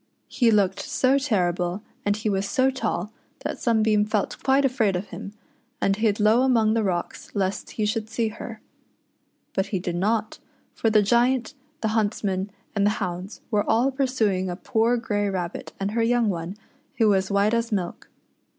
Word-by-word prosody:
He 240 -3 +3
looked 200 -3 +3
so 275 -3 +2
terrible, 180 -6 0 0.2
and 205 0 +2
he 215 +1 -3
was 195 -1 0
so 265 -1 +3
tall, 225 -4 -2 0.3
that - - -4
Sunbeam 220 -3 +3
felt 210 -1 -2
quite 275 +1 +3
afraid 230 -7 +2
of 190 +2 -4
him, 200 - -8 0.5
and 195 - +2
hid 215 -1 +1
low 215 +3 +5
among 230 -5 +3
the 225 - +2
rocks 180 -4 -3
lest 195 -1 -2
he 215 - -1
.should 215 +1 -1
see 225 0 0
her. 220 0 -8 0.9
But 190 +1 0
he 195 - -1
did 175 -1 -3
not, 215 +4 0 0.3
for 225 - +1
the 215 -1 +4
Giant, 240 +4 +2 0.3
the 220 - +1
hunts 215 -1 0
men, 190 0 -1 0.3
and 200 - +2
the 205 - +5
hounds 180 +3 -5
were 210 -2 +2
all 240 +5 +3
pursuing 225 -9 0
a 175 - -3
poor 230 +4 +1
grey 205 -3 -1
rabbit 180 -3 -4
and 195 +1 -1
her 230 +1 0
young 235 -1 +2
one, 175 +1 -4 0.4
who 225 - +4
was 190 -1 +2
white 200 +2 +2
as 230 0 0
milk. 185 -4 -3
215 Hz, 180 wpm, -25 LUFS, 195-230 Hz, 0.9 s, low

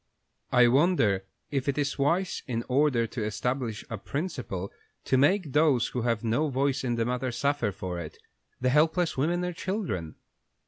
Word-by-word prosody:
I 125 -1 +6
wonder 120 - +3 0.3
if 140 -1 -1
it 140 - -1
is 145 -1 -1
wise, 170 +7 +1
in 115 -2 -2
order 130 -3 +2
to 115 0 -4
establish 115 +2 -2
a - - -5
principle, 125 - -4 0.3
to 130 - +1
make 145 +3 +3
those 145 -6 +3
who 125 - -3
have 115 -1 0
no 120 +7 +1
voice 135 +1 0
in 120 -2 0
the 115 -1 0
matter 125 +1 -1
suffer 140 -2 0
for 90 -2 -5
it 80 -3 -8 0.4
the 130 - +1
helpless 160 +5 +2
women 170 +6 0
and 180 -1 -3
children?" 165 - -3
130 Hz, 170 wpm, -28 LUFS, 115-150 Hz, 0.4 s, I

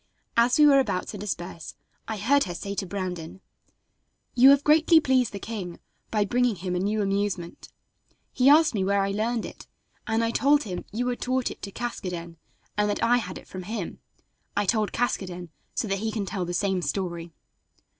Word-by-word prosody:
As 235 +2 +4
we 300 - +7
were 280 -2 +7
about 200 -8 -1
to 210 - -6
disperse 175 -4 -5 0.3
I 220 - -3
heard 280 +8 +3
her 175 -2 -5
say 200 +3 -5
to 195 -1 -3
Brandon: 180 -3 -5 0.9
"You 255 +2 +7
have 280 0 +6
greatly 320 +2 +6
pleased 260 -5 +2
the 200 - -6
king 195 -4 -6 0.3
by 210 -2 +1
bringing 245 +1 +1
him 180 0 -4
a - - 0
new 210 +3 0
amusement. 195 -3 -2 0.6
He 255 +1 +4
asked 310 0 +6
me 200 -3 0
where 200 +1 +2
I 195 - -1
learned 225 +3 -1
it, - - -10 0.4
and 225 +1 +1
I 230 - +1
told 290 +4 +3
him 180 -4 -5
you 240 +4 -2
had 245 - -4
taught 255 0 0
it - - -11
to 200 - -6
Caskoden, 180 -8 -5 0.4
and 210 0 +1
that 205 - -1
I 245 +1 +4
had 185 -6 -4
it - - -13
from 185 - -7
him. 200 -1 -5 0.6
I 205 - +2
told 215 +1 +1
Caskoden 180 -7 -2 0.3
so 225 - -1
that 195 -1 -1
he 220 +1 -2
can 210 -2 -2
tell 190 -2 -3
the 175 - -4
same 190 -1 0
story." 170 -2 -3
205 Hz, 195 wpm, -26 LUFS, 185-245 Hz, 0.9 s, we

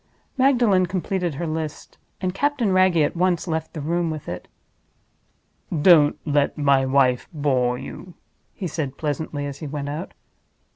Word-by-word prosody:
Magdalen 240 -9 +3
completed 180 -2 -2
her 170 - -3
list; 155 -1 -5 0.2
and 185 -1 -1
Captain 265 -2 0
Wragge 185 -2 +4
at 150 0 +2
once 180 0 +1
left 160 -1 -3
the 155 - -5
room 170 +3 0
with 155 -2 -6
it. 90 - -6 1.2
"Don't 155 -2 +5
let 145 -2 +1
my 140 -2 +3
wife 130 -2 +2
bore 130 -5 +1
you," 180 +7 -9 0.4
he 195 - -5
said, 145 -5 -4
pleasantly, 145 -1 -3
as 140 -1 -6
he 155 - -6
went 145 0 -4
out. 155 +5 -6
160 Hz, 150 wpm, -23 LUFS, 145-180 Hz, 1.2 s, Don't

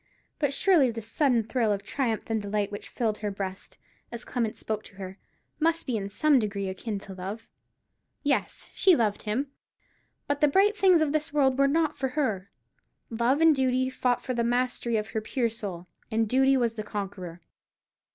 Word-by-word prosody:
But 290 -3 +1
surely 300 -3 +4
this 225 -2 -6
sudden 245 -1 +2
thrill 225 -1 0
of 200 -1 -1
triumph 225 0 -1
and 225 -1 -1
delight 205 0 -1
which 205 - -7
filled 220 -4 -1
her 210 - -2
breast, 195 -1 -6 0.3
as 235 0 -7
Clement 230 -4 -2
spoke 215 -1 -3
to - - -14
her, 190 0 -8 0.4
must 330 +1 +1
be 255 - -1
in 200 -2 -3
some 290 +6 +3
degree 200 -3 -2
akin 205 +3 -4
to 195 - -9
love. 195 +5 -7 0.7
Yes, 285 -2 -1
she 375 -3 +5
loved 215 -5 0
him; 255 +6 -2 0.7
but 285 0 -2
the 300 - +6
bright 395 +8 +4
things 375 -5 +5
of 295 - 0
this 310 0 -1
world 270 -3 +2
were 275 - +5
not 310 +1 +1
for 265 - -1
her. 205 -10 0 0.6
Love 240 +6 +1
and 325 -2 +6
Duty 260 -1 +1
fought 250 -2 0
for 255 - -2
the 235 -1 0
mastery 240 -1 0
of 215 +1 -3
her 220 - -2
pure 235 +1 -1
Soul: 195 -6 -6 0.2
and 225 0 +1
Duty 265 +3 +4
was 235 -3 +1
the 215 -2 -5
conqueror. 190 -5 -6
235 Hz, 190 wpm, -27 LUFS, 210-275 Hz, 0.7 s, the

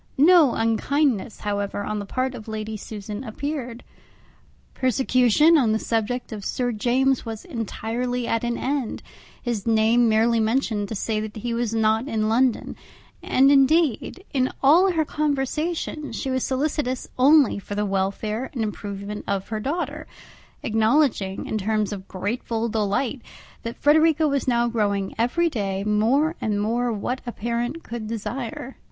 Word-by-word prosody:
No 315 -2 +6
unkindness, 230 +1 0
however, 205 -1 -2
on 215 0 -3
the 200 - -6
part 255 +3 -1
of 230 -3 -9
Lady 220 0 -4
Susan 210 +1 -7
appeared. 250 0 -5 0.9
Persecution 255 +5 +4
on 225 -5 +2
the - - +2
subject 230 +3 -2
of 210 -2 -6
Sir 245 +4 -1
James 255 +4 +1
was 225 -2 -7
entirely 245 - -3
at 230 0 -1
an 235 0 -1
end; 270 -4 -2 0.4
his 235 -4 -3
name 225 +1 +4
merely 225 +1 +3
mentioned 220 -3 0
to 220 - -4
say 215 +2 -1
that 215 0 -5
he 235 +2 -3
was 230 -1 -1
not 220 +3 +2
in 215 -5 0
London; 245 +1 +1 0.5
and 270 +2 +4
indeed, 300 - +2
in 260 -2 +1
all 345 +8 +6
her 320 -3 +1
conversation, 300 +2 -2
she 265 - -3
was 260 -1 0
solicitous 270 -1 -1
only 280 -4 +5
for 205 +1 -7
the 210 0 0
welfare 200 +5 -2
and 235 - -1
improvement 205 -1 -5
of 195 -1 -2
her 220 -1 -2
daughter, 295 +10 -3 0.6
acknowledging, 220 -3 +1
in 215 - -2
terms 215 +1 0
of 195 -1 -8
grateful 225 +4 -2
delight, 220 +5 -1 0.4
that 230 0 -6
Frederica 315 +1 +4
was 280 -2 -1
now 240 -1 +2
growing 205 -4 -1
every 295 +9 +2
day 195 -9 -2
more 230 +10 +2
and 210 -2 0
more 235 +3 0
what 245 +4 -3
a - - -2
parent 240 +8 -3
could 230 -2 -6
desire. 235 +3 -5
235 Hz, 150 wpm, -24 LUFS, 215-270 Hz, 0.9 s, No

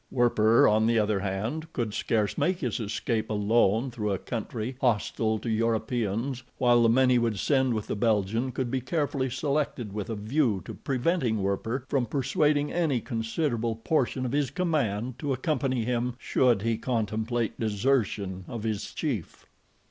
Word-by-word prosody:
Werper, 115 -2 +4
on 110 +1 +3
the 115 0 +3
other 105 -2 +2
hand, 110 +12 -3
could 115 -4 -2
scarce 105 -2 0
make 185 0 0
his 125 -5 -1
escape 110 +1 -2
alone 110 +3 +2
through 105 -3 -2
a 95 - 0
country 115 +3 -4
hostile 110 -2 +1
to 115 - -7
Europeans 115 +2 -1 0.2
while 120 -2 +4
the 115 - +5
men 130 +2 +4
he 125 - +5
would 115 -3 0
send 130 +2 +2
with 110 - -3
the - - -3
Belgian 110 +3 +1
could 125 -1 -3
be 130 - 0
carefully 140 -1 -1
selected 140 -6 -2
with 105 0 -4
a 115 - -2
view 110 - 0
to - - -6
preventing 130 - 0
Werper 115 +6 -2
from 130 -3 0
persuading 145 +3 +1
any 160 -7 +1
considerable 115 0 -2
portion 130 +1 0
of 125 - -2
his 145 -1 +1
command 130 - -1
to 145 -3 -1
accompany 130 -3 -1
him 125 0 -1
should 125 -5 +2
he 115 -1 0
contemplate 115 0 -1
desertion 105 -4 0
of 115 -4 -6
his 110 -3 -3
chief. 125 - -4
120 Hz, 165 wpm, -27 LUFS, 110-130 Hz, 0.2 s, the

